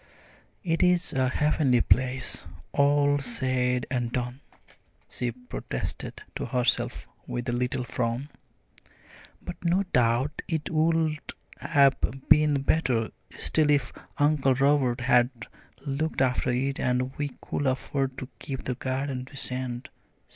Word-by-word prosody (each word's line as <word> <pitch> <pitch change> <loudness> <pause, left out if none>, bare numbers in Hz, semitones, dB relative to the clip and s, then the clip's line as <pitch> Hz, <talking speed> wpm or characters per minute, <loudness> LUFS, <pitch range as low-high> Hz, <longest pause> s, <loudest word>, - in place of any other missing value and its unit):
"It 165 -2 0
is 180 -1 +3
a 130 -1 +2
heavenly 135 -3 +2
place, 130 +1 +2 0.3
all 145 0 +3
said 125 -1 0
and 120 -3 -1
done," 125 +2 -3 0.7
she 120 -1 -2
protested 125 +1 -6
to - - -3
herself 125 0 0 0.2
with 120 +1 -4
a - - +1
little 125 +1 -1
frown. 125 +3 -2 1.1
"But - - -8
no 180 +3 +2
doubt 125 +4 +2
it 160 -2 -2
would 160 -1 +2 0.4
have 140 -1 +4 0.3
been 150 -2 +5
better 125 -8 +1 0.3
still 155 -2 +1
if 145 -4 +2 0.2
Uncle 145 -3 +3
Robert 135 -2 +2
had 120 0 +4 0.6
looked 150 +3 -2
after 130 -1 +1
it 135 +3 0
and 125 +1 0
we 145 -3 -3
could 145 - -2
afford 130 0 -1
to 130 0 -6
keep 135 -3 -6
the 125 - -1
garden 130 +1 -3
decent. 130 -2 -5
130 Hz, 125 wpm, -27 LUFS, 125-145 Hz, 1.1 s, been